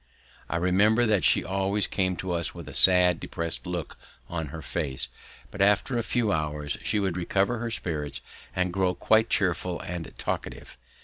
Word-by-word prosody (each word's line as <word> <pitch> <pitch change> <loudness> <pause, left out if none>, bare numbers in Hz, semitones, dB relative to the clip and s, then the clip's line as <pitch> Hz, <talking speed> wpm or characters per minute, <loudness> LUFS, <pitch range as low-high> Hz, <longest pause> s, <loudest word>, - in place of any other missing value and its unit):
I - - -2
remember 100 +7 +3
that 105 -6 +2
she - - +5
always 100 +2 0
came 95 -2 -1
to 90 +1 -5
us 85 -2 -2
with - - -9
a - - -8
sad, 90 -2 +6
depressed 85 +2 -3
look 85 -4 -5 0.3
on 80 -3 -3
her 80 +3 -8
face, 75 -7 -3 0.4
but 100 - -5
after 105 +6 +3
a 120 - +1
few 115 -2 0
hours 75 -2 -2
she 105 - 0
would 95 -3 -1
recover 95 +6 0
her 120 0 -3
spirits 80 -9 -3 0.3
and 90 -1 0
grow 95 -1 +1
quite 110 +1 +3
cheerful 90 -2 0
and 85 -2 -6
talkative. - - -5
90 Hz, 175 wpm, -26 LUFS, 85-100 Hz, 0.4 s, sad